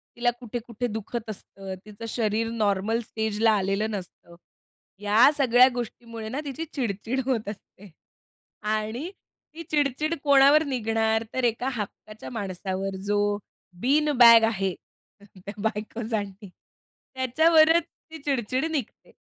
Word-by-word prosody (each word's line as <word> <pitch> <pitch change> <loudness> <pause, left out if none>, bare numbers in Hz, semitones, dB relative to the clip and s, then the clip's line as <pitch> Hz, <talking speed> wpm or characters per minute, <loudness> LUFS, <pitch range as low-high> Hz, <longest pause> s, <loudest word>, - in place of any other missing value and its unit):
तिला 240 0 +2
कुठे-कुठे 240 0 -5
दुखत 220 +1 -5
असतं, 195 -2 -8
तिचं 215 +2 -9
शरीर 225 0 -1
नॉर्मल 215 0 0
स्टेजला 220 0 0
आलेलं 205 +1 0
नसतं. 180 -3 -8 0.6
या 210 +6 +5
सगळ्या 250 -1 +6
गोष्टीमुळे 230 -2 -6
ना 265 - -3
तिची 290 +4 -4
चिड-चिड 235 -1 -2
होत 240 -6 -1
असते 205 -1 -12 0.8
आणि 220 +9 -3 0.5
ती 335 - -7
चिड-चिड 300 +1 +1
कोणावर 280 +2 +6
निघणार? 225 -4 0
तर 260 - -1
एका 240 +2 +1
हक्काच्या 215 0 -7
माणसावर, 195 -2 -4
जो 205 0 +1 0.6
"बीन 295 +4 +3
बॅग" 230 -2 +9
आहे 195 -4 -1 0.6
त्या 190 +2 -9
बायकोसाठी, 215 -2 -3
त्याच्यावरच 315 - +1 0.3
ती 320 - -7
चिड-चिड 260 -1 0
निघते. 275 -8 -5
225 Hz, 115 wpm, -26 LUFS, 210-260 Hz, 0.8 s, बॅग